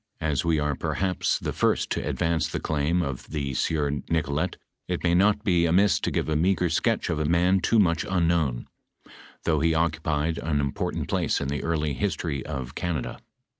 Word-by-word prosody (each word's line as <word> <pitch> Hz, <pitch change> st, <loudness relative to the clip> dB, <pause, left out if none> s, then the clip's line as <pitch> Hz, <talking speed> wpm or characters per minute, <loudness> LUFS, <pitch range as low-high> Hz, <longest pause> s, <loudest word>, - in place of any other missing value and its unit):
I -, -, -4 dB
As 70 Hz, -, 0 dB
we 85 Hz, -2 st, +2 dB
are 75 Hz, -1 st, 0 dB
perhaps 90 Hz, +6 st, -1 dB
the -, -, -4 dB
first -, -, +1 dB
to -, -, -1 dB
advance 80 Hz, 0 st, 0 dB
thadnim 80 Hz, +3 st, 0 dB
of 65 Hz, -2 st, -6 dB
the 70 Hz, -3 st, -3 dB
sieur 75 Hz, +1 st, 0 dB
NicnTet, 75 Hz, +2 st, -1 dB, 0.3 s
it 90 Hz, -1 st, -3 dB
may 85 Hz, -1 st, +3 dB
not 105 Hz, +3 st, +3 dB
be 90 Hz, -5 st, +3 dB
amiss 95 Hz, +4 st, +4 dB
to -, -, -1 dB
give -, -, -1 dB
a 80 Hz, -, 0 dB
meager 90 Hz, +2 st, +2 dB
sketch 80 Hz, -, 0 dB
of -, -, -1 dB
a 75 Hz, -, 0 dB
man 90 Hz, +4 st, +3 dB
too 115 Hz, +5 st, +2 dB
mncli 85 Hz, -2 st, +2 dB
nnknown, 85 Hz, -9 st, +1 dB, 0.8 s
tliongh 80 Hz, -1 st, +2 dB
he 80 Hz, -1 st, +3 dB
occupied 80 Hz, -1 st, 0 dB
an 75 Hz, -2 st, -1 dB
important 70 Hz, -1 st, -2 dB
place -, -, 0 dB
in 70 Hz, -, -3 dB
the 75 Hz, -, -3 dB
early 80 Hz, -3 st, 0 dB
history 70 Hz, +2 st, -2 dB
of 65 Hz, -2 st, -5 dB
Canada. 80 Hz, -5 st, -3 dB
80 Hz, 185 wpm, -26 LUFS, 75-85 Hz, 0.8 s, amiss